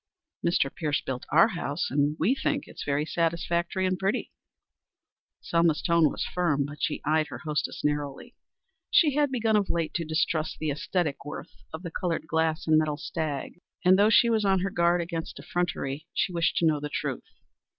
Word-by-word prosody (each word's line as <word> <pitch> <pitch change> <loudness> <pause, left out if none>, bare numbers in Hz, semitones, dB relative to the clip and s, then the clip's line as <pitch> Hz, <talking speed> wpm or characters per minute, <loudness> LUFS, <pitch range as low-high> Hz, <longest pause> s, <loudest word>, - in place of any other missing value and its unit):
"Mr. 155 -5 +1
Pierce 150 -2 -1
built 130 -1 -5
our 170 +8 +6
house, 170 -4 -3
and 145 +2 +1
we 205 +11 +3
think 280 +1 -1
it - - -10
very 145 +1 0
satisfactory 170 +3 0
and 185 -1 0
pretty." 195 +2 -1 1.1
Selma's 170 -2 +2
tone 170 -3 +4
was - - -3
firm, 150 -6 0
but 145 +1 -9
she - - -1
eyed 155 +1 +2
her - - -7
hostess 150 -1 -2
narrowly. 145 -2 -2 0.5
She 300 -5 +5
had 290 -1 +2
begun 225 -4 +1
of 205 -2 +2
late 165 -2 -1
to 170 - -1
distrust 155 0 -1
the 155 - -2
æsthetic 150 +1 -1
worth 145 - -8 0.2
of 160 +3 -7
the 170 - -5
colored 170 -3 -2
glass 160 +1 0
and 155 -1 +5
metal 155 -1 -1
stag, 155 +1 -4 0.2
and, 185 +1 +6
though 210 +2 +6
she 235 - +6
was 225 -2 +2
on 190 -2 +3
her 195 +1 -1
guard 170 0 +2
against 165 -1 -5
effrontery, 160 -4 -3
she 185 - 0
wished 170 -1 +1
to 170 - +3
know 155 -2 +3
the 150 0 -4
truth. - - -3
165 Hz, 185 wpm, -27 LUFS, 150-180 Hz, 1.1 s, our